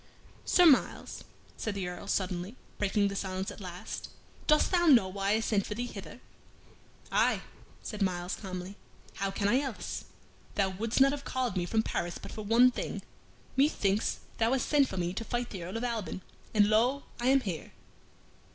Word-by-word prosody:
"Sir 360 Hz, -, +5 dB
Myles," 290 Hz, -6 st, +3 dB, 0.3 s
said 220 Hz, -2 st, -3 dB
the 190 Hz, -2 st, -2 dB
Earl, 180 Hz, +2 st, -7 dB
suddenly, 185 Hz, +2 st, -1 dB, 0.2 s
breaking 205 Hz, 0 st, +2 dB
the 200 Hz, -, -3 dB
silence 190 Hz, 0 st, -3 dB
at -, -, -11 dB
last, 180 Hz, -1 st, -6 dB, 0.4 s
"dost 305 Hz, -1 st, +4 dB
thou 345 Hz, -2 st, +3 dB
know 240 Hz, -10 st, +7 dB
why 195 Hz, +1 st, 0 dB
I 220 Hz, -, +2 dB
sent 210 Hz, -3 st, +1 dB
for 210 Hz, -, -4 dB
thee 240 Hz, +2 st, -2 dB
hither?" -, -, -8 dB, 0.9 s
"Aye," -, -, +3 dB, 0.4 s
said 210 Hz, -1 st, -6 dB
Myles, 180 Hz, -1 st, 0 dB
calmly, 185 Hz, 0 st, -6 dB, 0.4 s
"how 195 Hz, 0 st, 0 dB
can 200 Hz, +1 st, -1 dB
I 245 Hz, +6 st, +4 dB
else? 265 Hz, -7 st, -5 dB, 0.5 s
Thou 195 Hz, -2 st, +2 dB
wouldst 220 Hz, +7 st, -1 dB
not 275 Hz, 0 st, +7 dB
have 285 Hz, -1 st, -4 dB
called 255 Hz, -6 st, -1 dB
me 175 Hz, -1 st, -1 dB
from 220 Hz, +2 st, +2 dB
Paris 175 Hz, -4 st, -2 dB
but -, -, -9 dB
for 220 Hz, -, -6 dB
one 230 Hz, +4 st, +5 dB
thing. -, -, -4 dB, 0.5 s
Methinks 220 Hz, -8 st, +2 dB, 0.2 s
thou 230 Hz, +2 st, +3 dB
hast 265 Hz, -, 0 dB
sent 285 Hz, -2 st, +4 dB
for 190 Hz, -, -6 dB
me 175 Hz, 0 st, -1 dB
to 230 Hz, -, -3 dB
fight 240 Hz, +1 st, -2 dB
the 190 Hz, -, -5 dB
Earl 185 Hz, +6 st, -4 dB
of 230 Hz, -, -4 dB
Alban, 225 Hz, -6 st, -3 dB, 0.3 s
and 210 Hz, -2 st, +5 dB
lo! 240 Hz, +6 st, +3 dB, 0.2 s
I 240 Hz, -, 0 dB
am 270 Hz, +1 st, +5 dB
here." 180 Hz, -9 st, -5 dB
210 Hz, 185 wpm, -30 LUFS, 190-245 Hz, 0.9 s, know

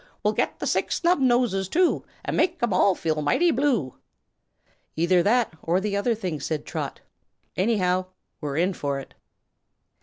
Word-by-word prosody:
We'll -, -, +2 dB
get -, -, -1 dB
the -, -, -4 dB
Six -, -, 0 dB
Snubnoses, 245 Hz, -, +2 dB
too, 360 Hz, -, +2 dB, 0.2 s
And -, -, -2 dB
make'em 335 Hz, -, +1 dB
all 185 Hz, +1 st, +4 dB
feel 155 Hz, -2 st, -1 dB
mighty 335 Hz, -, +3 dB
blue." 245 Hz, -, 0 dB, 1.0 s
"Either 175 Hz, +2 st, +3 dB
that 225 Hz, +2 st, +2 dB
or 175 Hz, +3 st, +1 dB
the 200 Hz, +1 st, -2 dB
other 225 Hz, +3 st, +1 dB
thing," 180 Hz, -8 st, -4 dB
said 150 Hz, +2 st, -3 dB
Trot. -, -, -5 dB, 0.5 s
"Anyhow, 185 Hz, -3 st, +1 dB, 0.3 s
we're 145 Hz, -2 st, -3 dB
in 180 Hz, +4 st, +2 dB
for 140 Hz, -4 st, -3 dB
it." 135 Hz, -, -11 dB
190 Hz, 150 wpm, -25 LUFS, 165-240 Hz, 1.0 s, all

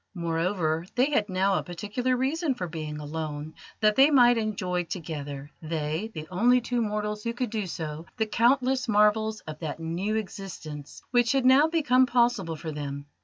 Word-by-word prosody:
Moreover, 165 Hz, -1 st, 0 dB
they 260 Hz, +4 st, +3 dB
had 210 Hz, -7 st, +1 dB
now 190 Hz, +1 st, +2 dB
a -, -, -5 dB
particular 215 Hz, +8 st, -2 dB
reason 280 Hz, +3 st, 0 dB
for 180 Hz, -6 st, -4 dB
being 155 Hz, -2 st, -5 dB
alone 150 Hz, 0 st, -5 dB, 0.3 s
that 215 Hz, -1 st, +4 dB
they 275 Hz, +2 st, +7 dB
might 245 Hz, -4 st, +6 dB
enjoy 185 Hz, -5 st, -1 dB
together 145 Hz, -4 st, -6 dB
they, 160 Hz, +5 st, -3 dB
the 155 Hz, 0 st, -6 dB
only 240 Hz, +7 st, +4 dB
two 245 Hz, 0 st, -1 dB
mortals 210 Hz, -1 st, -2 dB
who 235 Hz, -, -2 dB
could 245 Hz, -2 st, -3 dB
do 215 Hz, -4 st, -2 dB
so 160 Hz, 0 st, -6 dB
the 220 Hz, -, +1 dB
countless 255 Hz, +4 st, +2 dB
marvels 215 Hz, 0 st, +3 dB
of 155 Hz, -1 st, -8 dB
that 160 Hz, -1 st, -5 dB
new 175 Hz, +6 st, -2 dB
existence 185 Hz, -8 st, -6 dB
which 240 Hz, -1 st, +3 dB
had 270 Hz, -2 st, +1 dB
now 265 Hz, +4 st, +6 dB
become 260 Hz, -6 st, +3 dB
possible 235 Hz, -9 st, +1 dB
for 155 Hz, +1 st, -6 dB
them. 140 Hz, -1 st, -5 dB
205 Hz, 170 wpm, -27 LUFS, 160-245 Hz, 0.3 s, they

